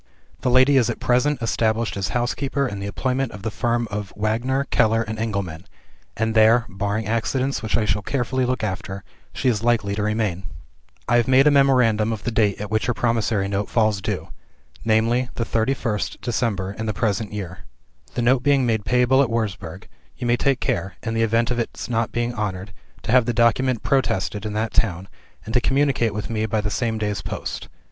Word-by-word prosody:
"The - - 0
lady 130 +3 +5
is 125 - +3
at - - -3
present 125 +1 +1
established 115 0 0
as 100 -2 -1
housekeeper 135 +3 -1
in 100 -4 -5
the 100 - -4
employment 130 +5 -1
of 100 - -10
the 110 - -2
firm 120 +2 0
of 105 -2 -4
Wagner, 120 +6 0
Keller, 115 +1 +3
and 110 0 -6
Engelman; 100 -6 -3 0.5
and 110 0 0
there 115 +2 +5
(barring 100 +2 -2
accidents, 130 +5 -1
which 110 +1 0
I 110 - +1
shall 105 -1 0
carefully 130 +3 -1
look 125 -2 -1
after) 95 -1 -4 0.3
she 130 - -2
is 110 -4 +2
likely 115 -4 +1
to 105 - -2
remain. 105 -4 -1 0.6
"I 120 - +4
have 120 - +2
made 130 +1 +5
a 150 - +6
memorandum 125 -6 +3
of 110 - -4
the 120 - -1
date 105 -3 +1
at 105 0 -6
which 110 +1 0
her 125 - 0
promissory 115 -4 0
note 100 0 -2
falls 110 -3 +1
due - - -3 0.5
viz., 115 +3 +2
the 115 - -1
31st 115 -3 -1
December 105 -5 -1
in 110 +2 -5
the 110 - -2
present 105 0 -1
year. 95 -3 -6 0.6
The 120 - 0
note 125 +1 +3
being 140 -1 +3
made 110 -3 0
payable 125 +2 +3
at 135 - +1
Wurzburg, 105 -7 -3 0.3
you - - -5
must 120 0 +2
take 135 -2 +2
care 95 +3 -2
(in 115 - -2
the 115 - 0
event 115 +2 +2
of 125 - -1
its 115 - -4
not 115 -2 -1
being 120 +1 -1
honored) 100 -3 -4 0.3
to 110 - -2
have 125 -1 +5
the 120 - +1
document 120 +1 +2
protested 110 -5 0
in 105 - -4
that 110 +1 -2
town, 95 -3 0 0.4
and 110 - -6
to 125 - +3
communicate 135 -6 +1
with 105 - -3
me 110 -1 -1
by 110 +1 0
the 105 0 -2
same 115 -2 -1
day's 105 -2 -2
post. - - -5
115 Hz, 200 wpm, -22 LUFS, 105-125 Hz, 0.6 s, a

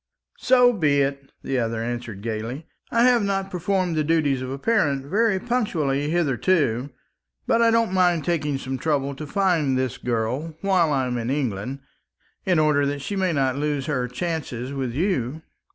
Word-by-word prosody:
"So 250 -1 +5
be 145 -8 +2
it," 140 0 -4
the 135 -1 -1
other 115 -1 -1
answered 115 -4 -5
gaily. 115 +6 -4 0.2
"I 230 0 +3
have 245 -2 +5
not 195 -1 -1
performed 180 -1 0
the 155 - +1
duties 145 -4 +1
of 130 - -4
a 135 - -4
parent 145 -8 +1
very 205 +5 +2
punctually 160 - 0
hitherto; 145 -4 +1 0.6
but 230 - +2
I 230 - +5
don't 230 -3 +2
mind 175 -5 +2
taking 150 -5 0
some 130 0 -5
trouble 140 -1 0
to 150 +2 -7
find 165 -7 +1
this 130 -2 -2
girl 125 +7 -2
while 185 -5 +2
I 135 -2 +1
am 125 -1 -2
in 115 +1 -3
England, 130 -1 -2 0.7
in 180 -3 +3
order 150 -2 +3
that 140 0 -3
she 205 - -3
may 190 -2 +1
not 135 -3 0
lose 145 -2 -1
her 130 -5 -1
chances 135 -3 -4
with 135 -3 -2
you." 155 - -1
145 Hz, 175 wpm, -23 LUFS, 130-180 Hz, 0.7 s, So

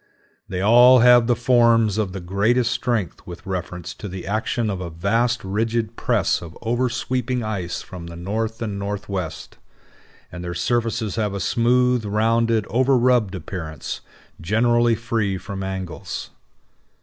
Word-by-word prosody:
They 95 -1 -3
all 120 +4 +7
have 120 -1 +6
the 120 - +3
forms 115 -3 +3
of 100 -4 -1
the 95 - -5
greatest 110 +7 +1
strength 120 -7 -2
with 85 -1 -9
reference 90 -2 -5
to 105 - -8
the 95 -1 -7
action 110 +2 -1
of 95 -2 -4
a 90 - -4
vast 115 +9 0
rigid 110 +3 -1
press - - +1
of 85 -1 -10
oversweeping 125 +1 -1
ice 100 -5 -3
from 85 -2 -9
the 85 - -9
north 110 +6 -3
and 100 -3 -4
northwest, 100 -4 -5 0.7
and 90 +1 -7
their 85 0 -5
surfaces 115 +2 -1
have 105 -3 -1
a - - -3
smooth, 125 +2 +2
rounded, 110 +1 +1
overrubbed 125 -3 +2
appearance, 80 -4 -6 0.4
generally 120 +5 +3
free 110 -4 -1
from 95 +1 -7
angles. 95 -3 -5
110 Hz, 140 wpm, -22 LUFS, 95-120 Hz, 0.7 s, all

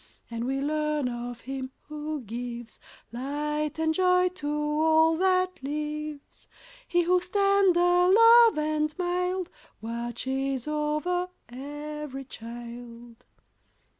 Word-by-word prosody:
And 230 0 -3
we 270 +1 -1
learn 300 -1 0
of 240 -1 -5
Him 265 0 -5
who 305 0 -5
gives 235 0 -7 0.3
Light 295 +4 -2
and 320 0 +1
joy 360 +1 +3
to 360 -5 -7
all 315 +2 +3
that 370 0 +1
lives: 300 +1 -5 0.4
He 350 0 +2
whose 360 +1 +1
tender 365 -3 +4
love 460 -1 +7
and 305 0 0
mild 360 0 -1 0.3
Watches 245 +4 -3
over 305 +4 -1 0.2
every 295 +1 -6
child. 235 0 -10
300 Hz, 105 wpm, -27 LUFS, 260-355 Hz, 0.4 s, love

